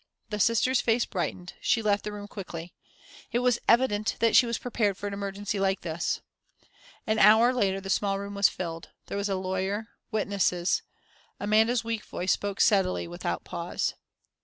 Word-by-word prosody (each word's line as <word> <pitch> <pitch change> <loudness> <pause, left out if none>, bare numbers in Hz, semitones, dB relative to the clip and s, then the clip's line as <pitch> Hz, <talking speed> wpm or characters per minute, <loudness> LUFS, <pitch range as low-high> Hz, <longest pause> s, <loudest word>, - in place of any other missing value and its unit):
The 210 - -2
Sister's 230 +5 +3
face 235 +1 +2
brightened, 180 -2 -4
she 225 - +2
left 205 -1 +2
the 210 - -4
room 205 0 -7
quickly. 175 -4 -8 0.6
It - - +1
was 245 -1 +2
evident 230 -3 +3
that 230 -1 +3
she 245 - +7
was 235 - -1
prepared 210 -5 -1
for 205 - -7
an 200 - -3
emergency 200 0 -3
like 195 0 +1
this. 165 0 -2 0.8
An 220 0 +1
hour 220 +4 +7
later 195 -6 +1
the 195 0 -4
small 195 +2 +1
room 200 0 -6
was 200 0 +4
filled 165 -2 -6 0.2
there - - -5
was 200 0 -1
a 195 - 0
lawyer, 190 +4 -2 0.2
witnesses.... 200 -5 +1 0.6
Amanda's 220 +3 +3
weak 230 -1 -3
voice 180 +1 -2
spoke 200 -1 -1
steadily, 190 -4 +3
without 175 +1 -3
a - - -38
pause.... 170 -1 -3
205 Hz, 175 wpm, -27 LUFS, 190-220 Hz, 0.8 s, she